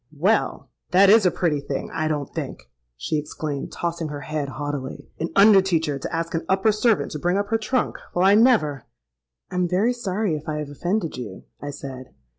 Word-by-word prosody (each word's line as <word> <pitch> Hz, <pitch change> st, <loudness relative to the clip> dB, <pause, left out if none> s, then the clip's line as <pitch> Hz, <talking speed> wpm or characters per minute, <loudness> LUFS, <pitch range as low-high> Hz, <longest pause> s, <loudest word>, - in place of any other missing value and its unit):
'Well! -, -, +1 dB, 0.2 s
that 195 Hz, +2 st, +6 dB
is 215 Hz, -3 st, +6 dB
a -, -, +5 dB
pretty 165 Hz, -4 st, 0 dB
thing, 140 Hz, -1 st, -4 dB
I 155 Hz, -1 st, -1 dB
don't 145 Hz, -3 st, -3 dB
think!' -, -, -6 dB, 0.3 s
she 155 Hz, -, -1 dB
exclaimed, 150 Hz, -1 st, -5 dB
tossing 170 Hz, -1 st, -3 dB
her 145 Hz, -1 st, -6 dB
head 150 Hz, -2 st, -3 dB
haughtily: 140 Hz, 0 st, -5 dB
'an 165 Hz, -, -2 dB
under 200 Hz, -1 st, +7 dB
teacher 160 Hz, -6 st, 0 dB
to -, -, -5 dB
ask 165 Hz, 0 st, -2 dB
an 165 Hz, -, -1 dB
upper 190 Hz, +3 st, +3 dB
servant 215 Hz, 0 st, +1 dB
to 150 Hz, -, -4 dB
bring 175 Hz, +5 st, +1 dB
up 205 Hz, 0 st, -1 dB
her 225 Hz, -, +2 dB
trunk! 250 Hz, +4 st, -1 dB, 0.2 s
Well—I 190 Hz, +3 st, +5 dB
never!'—'I 135 Hz, -, 0 dB
am 180 Hz, -1 st, +2 dB
very 195 Hz, +8 st, +2 dB
sorry 205 Hz, -6 st, -1 dB
if 150 Hz, +1 st, -6 dB
I 150 Hz, -, -2 dB
have 150 Hz, -1 st, -4 dB
offended 175 Hz, +4 st, -2 dB
you,' 105 Hz, -7 st, -7 dB, 0.2 s
I 145 Hz, -, -5 dB
said. 135 Hz, -2 st, -8 dB
165 Hz, 195 wpm, -23 LUFS, 145-195 Hz, 0.3 s, under